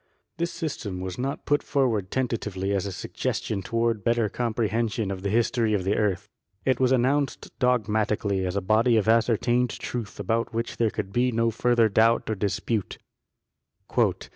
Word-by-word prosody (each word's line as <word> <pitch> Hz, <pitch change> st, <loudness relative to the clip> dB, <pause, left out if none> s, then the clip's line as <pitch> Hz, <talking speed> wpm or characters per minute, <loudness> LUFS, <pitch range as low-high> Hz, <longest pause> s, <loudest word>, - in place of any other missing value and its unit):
This 170 Hz, 0 st, -1 dB
system 130 Hz, -, -4 dB
was 95 Hz, +2 st, -5 dB
not 135 Hz, +2 st, -3 dB
put 145 Hz, 0 st, +2 dB
forward 115 Hz, -9 st, 0 dB
tentatively 105 Hz, -6 st, -2 dB
as 100 Hz, 0 st, 0 dB
a -, -, -4 dB
sug -, -, -8 dB
gestion 100 Hz, -3 st, -2 dB
toward 115 Hz, +2 st, 0 dB
a -, -, -16 dB
better 115 Hz, +1 st, +1 dB
comprehension 115 Hz, -2 st, -1 dB
of 95 Hz, -1 st, -5 dB
the 100 Hz, -, -2 dB
history 115 Hz, 0 st, +2 dB
of 95 Hz, -, -1 dB
the 95 Hz, +3 st, +1 dB
earth. 105 Hz, -1 st, 0 dB, 0.4 s
It 130 Hz, -2 st, +2 dB
was 130 Hz, -1 st, +3 dB
announced 135 Hz, +3 st, +1 dB
dogmatically 105 Hz, -5 st, +1 dB
as 90 Hz, 0 st, -2 dB
a 100 Hz, -, 0 dB
body 110 Hz, +4 st, +3 dB
of 110 Hz, -, +1 dB
ascertained 120 Hz, +2 st, +3 dB
truth 110 Hz, -2 st, -5 dB
about 115 Hz, +3 st, -1 dB
which 115 Hz, +1 st, -3 dB
there 115 Hz, -2 st, +2 dB
could 95 Hz, -1 st, -5 dB
be 125 Hz, +1 st, +2 dB
no 115 Hz, 0 st, +1 dB
further 120 Hz, 0 st, +3 dB
doubt 110 Hz, +2 st, +3 dB
or -, -, 0 dB
dispute. 105 Hz, +1 st, -2 dB
115 Hz, 170 wpm, -26 LUFS, 100-120 Hz, 0.4 s, was